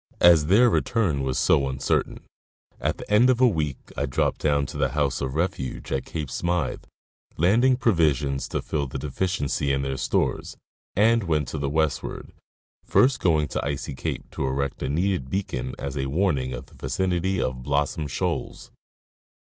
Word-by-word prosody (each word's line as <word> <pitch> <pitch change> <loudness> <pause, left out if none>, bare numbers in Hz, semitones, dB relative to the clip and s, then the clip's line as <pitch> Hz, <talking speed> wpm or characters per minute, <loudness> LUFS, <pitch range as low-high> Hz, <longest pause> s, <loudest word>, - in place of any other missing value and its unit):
As 85 -4 +6
their 110 +8 +6
return 105 - +1
was 65 -1 -1
so 70 -3 +3
uncertain, 65 0 -1 0.6
at - - -1
the - - -9
end 115 +5 +5
of 125 -2 +3
a 130 - +6
week 75 - -1 0.2
I 70 - -1
dropped 65 - 0
down 70 -2 +2
to 75 - -7
the 70 -3 +1
house 70 -3 0
of 65 0 -3
refuge 80 -6 -3
at 65 - -1
Cape 75 -5 -5
Smyth, 85 -1 -2 0.5
landing 120 +10 +4
provisions 75 - +1
to - - -3
fill 75 -3 -2
the 65 - -5
deficiency 70 0 -1
in 70 0 0
their 65 -1 -2
stores, - - -1 0.4
and 110 +1 +3
went 75 -4 0
to 75 - -4
the 70 -1 -1
westward, 80 0 -2 0.5
first 130 0 +3
going 80 -4 +2
to - - -2
Icy 70 0 -3
cape - - -5
to 70 - -2
erect 70 +1 -2
a - - -2
needed 85 -3 0
beacon 65 -9 -3
as 70 -1 -5
a 65 -1 -2
warning 70 -4 0
of 60 - -6
the - - -22
vicinity 95 0 -1
of 65 0 -2
Blossom 70 +3 -1
shoals. 70 - -3
75 Hz, 170 wpm, -25 LUFS, 70-90 Hz, 0.6 s, As